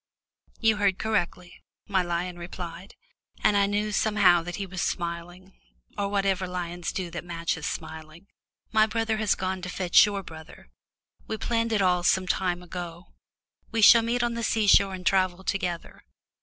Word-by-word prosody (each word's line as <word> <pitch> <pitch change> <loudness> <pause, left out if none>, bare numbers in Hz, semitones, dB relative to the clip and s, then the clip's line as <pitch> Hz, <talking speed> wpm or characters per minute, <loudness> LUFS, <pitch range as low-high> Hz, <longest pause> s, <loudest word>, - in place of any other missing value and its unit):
"You 220 -2 +3
heard 200 -2 +2
correctly," 180 -4 -2 0.3
my 195 -2 +2
lion 175 0 -3
replied, 175 +2 -8 0.5
and 205 - +4
I 200 0 +3
knew 205 +1 -1
somehow 200 -4 +4
that 175 +1 -6
he 200 - -4
was 185 -1 -5
smiling, 175 +2 -4 0.4
or 200 0 -2
whatever 195 -2 0
lions 175 -1 -4
do 180 -3 -4
that 175 - -6
matches 170 -2 -3
smiling. 160 +2 -7 0.5
"My 220 0 +4
brother 220 0 -1
has 215 -2 +1
gone 185 0 -3
to 180 - -5
fetch 180 -1 +5
your 200 -1 -3
brother 160 - -13 0.6
we 220 - -3
planned 230 +1 -1
it 210 -3 +2
all 180 -1 +3
some 185 +1 +2
time 180 -1 -1
ago 175 0 -8 0.6
we 225 -1 +1
shall 230 +4 +9
meet 235 +2 0
on 240 0 0
the 235 - -4
sea 220 -1 +1
shore 195 -1 +5
and 180 -1 -10
travel 185 -1 +1
together. 180 -4 -3
185 Hz, 170 wpm, -26 LUFS, 175-205 Hz, 0.6 s, shall